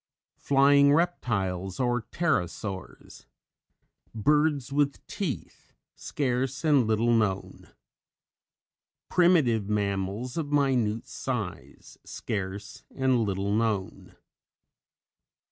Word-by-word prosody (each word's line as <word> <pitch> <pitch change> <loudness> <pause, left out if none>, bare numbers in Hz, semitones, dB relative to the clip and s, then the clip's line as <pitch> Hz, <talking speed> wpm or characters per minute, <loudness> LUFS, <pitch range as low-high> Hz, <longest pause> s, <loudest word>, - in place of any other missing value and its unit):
MOSASAURS - - -31
} - - -22
FLYING 140 +1 +5
REPTILES 95 - -1
OR 120 -1 +1
PTEROSAURS. 105 - -4 0.9
BIRDS 145 +3 +1
WITH 140 -1 0
TEETH 180 -10 -6 0.2
(scarce 135 0 -2
and 140 -7 +4
little 115 +2 +2
known). 105 -4 -1 1.4
PRIMITIVE 145 - +3
MAMMALS 100 - -2
of 150 -3 -3
minute 125 -6 +1
size 90 - -6
(scarce 100 0 -5
and 130 -2 +2
little 100 0 -1
known). 100 -4 -2
120 Hz, 85 wpm, -27 LUFS, 100-140 Hz, 1.4 s, FLYING